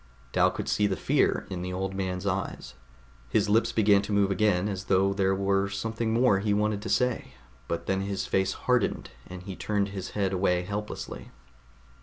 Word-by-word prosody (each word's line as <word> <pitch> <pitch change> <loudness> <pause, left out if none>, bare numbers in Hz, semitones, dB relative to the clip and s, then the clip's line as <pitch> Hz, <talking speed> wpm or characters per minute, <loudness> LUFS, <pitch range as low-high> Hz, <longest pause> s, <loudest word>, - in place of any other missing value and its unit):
Dal - - +4
could - - -5
see 105 - +2
the 95 - -1
fear - - +1
in 90 -2 -3
the 90 +1 -4
old 95 +1 -3
man's 95 -1 -3
eyes. 95 -8 -3 0.6
His 105 - +1
lips 115 +2 +3
began 100 -2 +4
to 100 - -6
move 100 -1 +3
again 100 -2 +2
as 100 -2 -4
though 95 +1 +3
there 95 -1 +1
were 100 0 +1
something 115 +3 -2
more 115 -3 +4
he 100 0 +1
wanted 105 0 0
to 110 - -5
say; 125 - 0 0.3
but 85 - -3
then 95 0 0
his 100 0 -2
face 95 0 +1
hardened, - - 0 0.2
and 90 0 -9
he 95 0 -6
turned 100 0 -1
his 95 -2 -6
head 100 -1 +1
away 90 -1 +1
helplessly. 105 +3 -6
100 Hz, 190 wpm, -27 LUFS, 95-105 Hz, 0.6 s, Dal